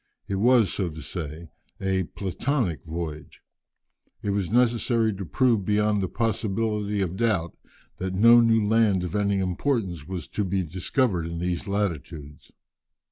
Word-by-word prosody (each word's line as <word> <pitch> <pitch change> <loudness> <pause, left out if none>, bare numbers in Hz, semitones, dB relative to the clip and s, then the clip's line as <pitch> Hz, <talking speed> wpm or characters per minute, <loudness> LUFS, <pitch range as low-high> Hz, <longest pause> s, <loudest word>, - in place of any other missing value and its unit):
It 95 - -2
was, 115 -2 +4
so 95 -4 -1
to 80 0 -9
say, 80 -1 -7 0.3
a 95 -1 0
"platonic" 100 - -2
voyage. 80 -1 -6 0.8
It 100 - 0
was 100 -3 -1
necessary 115 -2 +2
to 95 0 -6
prove 120 -3 +2
beyond 105 +1 +1
the 95 - 0
possibility 105 -1 -1
of 90 0 -3
doubt 105 -8 0 0.4
that 95 0 -3
no 115 +4 +7
new 115 -2 +3
land 105 -4 +3
of 90 0 -4
any 100 -1 +1
importance 95 - -1
was 90 -6 -5
to 105 - -2
be 95 0 0
discovered 90 - 0
in 85 0 -5
these 90 +2 -2
latitudes. 80 -7 -4
100 Hz, 145 wpm, -25 LUFS, 85-110 Hz, 0.8 s, no